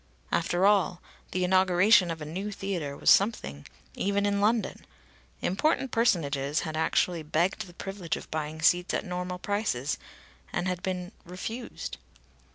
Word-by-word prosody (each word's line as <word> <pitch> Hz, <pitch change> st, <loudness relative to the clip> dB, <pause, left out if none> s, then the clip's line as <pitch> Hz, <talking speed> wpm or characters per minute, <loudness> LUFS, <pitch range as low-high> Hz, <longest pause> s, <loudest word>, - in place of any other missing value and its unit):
After 175 Hz, +2 st, +2 dB
all, 195 Hz, -4 st, +3 dB, 0.3 s
the 185 Hz, -, -1 dB
inauguration 185 Hz, +1 st, +5 dB
of 160 Hz, -2 st, -4 dB
a -, -, -6 dB
new 185 Hz, +7 st, -4 dB
theatre 175 Hz, -8 st, -3 dB
was -, -, +4 dB
something, 190 Hz, -, +2 dB, 0.3 s
even 200 Hz, +1 st, 0 dB
in 200 Hz, 0 st, +1 dB
London! 220 Hz, +2 st, +1 dB, 0.6 s
Important 270 Hz, -, +1 dB
personages 150 Hz, -, +1 dB
had 155 Hz, -2 st, -4 dB
actually 165 Hz, +1 st, +1 dB
begged 170 Hz, +7 st, 0 dB
the 175 Hz, -, -15 dB
privilege 195 Hz, -3 st, -4 dB
of -, -, -11 dB
buying 155 Hz, 0 st, -3 dB
seats 175 Hz, +1 st, +3 dB
at -, -, -2 dB
normal 180 Hz, 0 st, -3 dB
prices, 180 Hz, -, -1 dB, 0.5 s
and 175 Hz, +1 st, -1 dB
had 180 Hz, -1 st, -2 dB
been 180 Hz, -1 st, -3 dB
refused. 225 Hz, +7 st, -6 dB
180 Hz, 145 wpm, -28 LUFS, 165-200 Hz, 0.6 s, inauguration